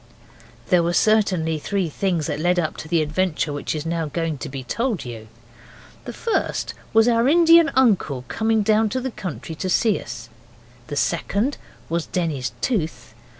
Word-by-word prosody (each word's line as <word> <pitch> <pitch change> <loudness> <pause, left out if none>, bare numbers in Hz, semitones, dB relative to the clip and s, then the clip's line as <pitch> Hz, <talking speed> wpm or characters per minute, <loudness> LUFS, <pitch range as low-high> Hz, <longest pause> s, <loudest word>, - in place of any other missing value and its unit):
There 180 -1 +5
were 170 +1 0
certainly 185 -7 +2
three 195 +3 -1
things 170 0 -1
that 150 -2 -3
led 175 +3 +2
up 165 -3 0
to - - -7
the 165 -1 +2
adventure 155 -1 -1
which 145 +2 -3
is 155 0 -4
now 165 -1 -1
going 160 -1 -3
to 145 - -5
be 135 -1 -6
told 225 - -2
you. 115 -3 -8 0.8
The - - -5
first 460 - -1 0.2
was 225 +1 +5
our 235 0 +3
Indian 330 +1 +6
uncle 190 - +2
coming 220 - +1
down 215 +1 +3
to 255 - -2
the 260 0 -4
country 175 -5 -6
to 185 +4 -4
see 215 +2 +2
us. 115 0 -8 0.6
The 145 - -5
second 200 - 0 0.3
was 170 0 -2
Denny's 150 -8 -2
tooth. 165 - -2
175 Hz, 170 wpm, -22 LUFS, 155-220 Hz, 0.8 s, Indian